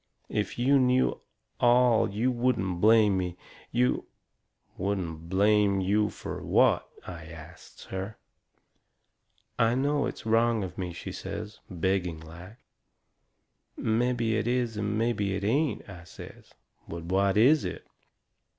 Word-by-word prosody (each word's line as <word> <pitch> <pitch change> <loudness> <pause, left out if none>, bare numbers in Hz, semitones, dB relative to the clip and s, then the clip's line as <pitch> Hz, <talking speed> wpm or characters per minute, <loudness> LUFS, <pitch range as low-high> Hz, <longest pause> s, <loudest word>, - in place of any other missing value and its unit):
If 105 -2 -2
you 135 +3 +4
knew 130 0 +2 0.4
ALL 120 -1 +4
you 110 +6 0
wouldn't 105 -8 0
blame 105 -3 +5
me. 90 -1 -4 0.3
You 125 +1 +1 0.3
" - - -41
"Wouldn't 85 -4 -3
blame 100 +1 +3
you 105 +3 +2
fur - - -7
what?" - - +2 0.2
I 85 -3 -8
asts 80 +1 -12
her. 95 +3 -6 1.4
"I 115 +1 +3
know 140 +2 +1
it's - - -7
wrong 115 -1 +2
of 95 - -6
me," 90 -2 -4
she 85 - -7
says, 105 0 -7
begging 90 -2 -1
like. 85 +7 -12 1.2
"Mebby 115 0 +1
it 110 +1 -1
is 120 -2 0
and 105 0 -2
mebby 105 -4 0
it 100 - -4
ain't," 140 +8 0
I 90 -4 -11
says. - - -12 0.4
"But 85 0 -6
what 95 +3 +1
is 135 +7 +5
it?" - - -5
105 Hz, 130 wpm, -28 LUFS, 95-120 Hz, 1.4 s, blame